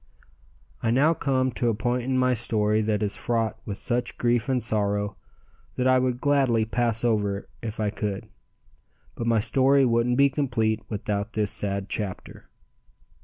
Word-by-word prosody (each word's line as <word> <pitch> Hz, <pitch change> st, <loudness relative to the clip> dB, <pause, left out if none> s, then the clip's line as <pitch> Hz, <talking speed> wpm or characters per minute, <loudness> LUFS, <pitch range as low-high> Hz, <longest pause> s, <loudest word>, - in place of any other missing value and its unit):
I 115 Hz, -, 0 dB
now 140 Hz, +7 st, +4 dB
come 130 Hz, -4 st, 0 dB
to 120 Hz, 0 st, 0 dB
a 115 Hz, -, 0 dB
point 120 Hz, +3 st, -1 dB
in 130 Hz, 0 st, 0 dB
my 130 Hz, 0 st, +3 dB
story 110 Hz, -2 st, +1 dB
that 105 Hz, -1 st, 0 dB
is 105 Hz, -, -2 dB
fraught 115 Hz, -2 st, -1 dB
with 100 Hz, -2 st, -4 dB
such 120 Hz, -1 st, -2 dB
grief 120 Hz, +1 st, +1 dB
and 130 Hz, -1 st, +2 dB
sorrow 105 Hz, -2 st, -1 dB, 0.6 s
that 125 Hz, -, -1 dB
I 130 Hz, 0 st, +5 dB
would 125 Hz, -1 st, -1 dB
gladly 135 Hz, -6 st, +2 dB
pass 115 Hz, 0 st, 0 dB
over 105 Hz, -4 st, 0 dB
if 110 Hz, -2 st, -6 dB
I 105 Hz, -2 st, 0 dB
could, 105 Hz, -2 st, -4 dB, 0.9 s
but 115 Hz, -, -4 dB
my 115 Hz, -1 st, +3 dB
story 135 Hz, +5 st, +3 dB
wouldn't 120 Hz, +1 st, +1 dB
be 140 Hz, 0 st, +5 dB
complete 115 Hz, -6 st, 0 dB
without 105 Hz, +1 st, -3 dB
this 105 Hz, -2 st, +2 dB
sad 100 Hz, -1 st, +1 dB
chapter. 100 Hz, -3 st, -6 dB
115 Hz, 165 wpm, -25 LUFS, 105-125 Hz, 0.9 s, I